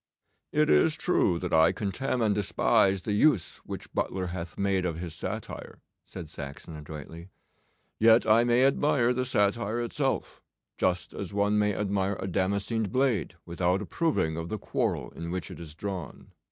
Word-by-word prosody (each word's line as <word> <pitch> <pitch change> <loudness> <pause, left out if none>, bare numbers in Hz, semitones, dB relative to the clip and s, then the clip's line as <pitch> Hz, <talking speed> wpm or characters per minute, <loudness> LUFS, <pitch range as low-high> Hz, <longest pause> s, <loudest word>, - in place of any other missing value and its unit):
'It 150 0 +3
is 155 0 +4
true 95 - +2
that 90 0 -4
I 80 +1 +6
contemn 120 +4 -2
and 105 -2 +3
despise 100 -1 +2
the 105 - -2
use 105 - +2
which - - -9
Butler 95 -1 -1
hath 85 -2 -6
made 100 -2 +1
of 85 -3 -2
his 85 -1 -6
satire,' - - -6 0.2
said 90 -4 -9
Saxon 75 +1 -8
adroitly; 75 +3 -9 0.7
'yet 115 +1 +6
I 110 +2 +5
may 120 +2 +4
admire 135 -3 +3
the 130 +1 -1
satire 105 0 +1
itself, 135 +3 -2 0.4
just 90 -1 0
as 100 0 -6
one 105 +1 +2
may 105 -1 +1
admire 100 -1 -1
a - - -3
damascened 100 +3 0
blade 130 -8 +1
without 90 +2 0
approving 105 - 0
of 80 +1 -4
the 110 - -2
quarrel - - -2
in 85 0 -7
which 90 0 -4
it - - -9
is 80 -3 -9
drawn. 95 -1 -6
100 Hz, 165 wpm, -28 LUFS, 85-115 Hz, 0.7 s, I